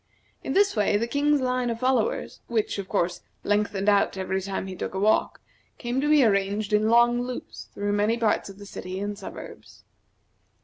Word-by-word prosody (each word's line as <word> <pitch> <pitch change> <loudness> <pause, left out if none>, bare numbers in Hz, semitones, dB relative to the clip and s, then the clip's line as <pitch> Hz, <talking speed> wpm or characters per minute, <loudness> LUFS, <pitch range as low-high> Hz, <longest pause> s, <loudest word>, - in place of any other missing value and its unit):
In - - -2
this 400 -5 +3
way 205 -1 +2
the 225 - 0
King's 285 +3 +1
line 250 -1 0
of 230 -1 -3
followers, 265 - 0
which, 220 -3 -1
of 190 -1 -6
course, 175 0 0 0.2
lengthened 205 -1 0
out 200 -1 +3
every 190 0 -2
time 195 0 -4
he 190 -1 -6
took 185 - -5
a - - -1
walk, 215 +2 +2 0.4
came 245 +2 -2
to 295 - 0
be 300 -2 +6
arranged 200 0 +1
in 215 +1 +3
long 240 +1 +4
loops 245 0 -7
through 205 0 -1
many 210 +3 +2
parts 220 -3 +1
of 195 - -11
the 205 - -11
city 185 -1 -6
and 205 +1 -3
suburbs. - - -10
210 Hz, 190 wpm, -25 LUFS, 200-245 Hz, 0.4 s, be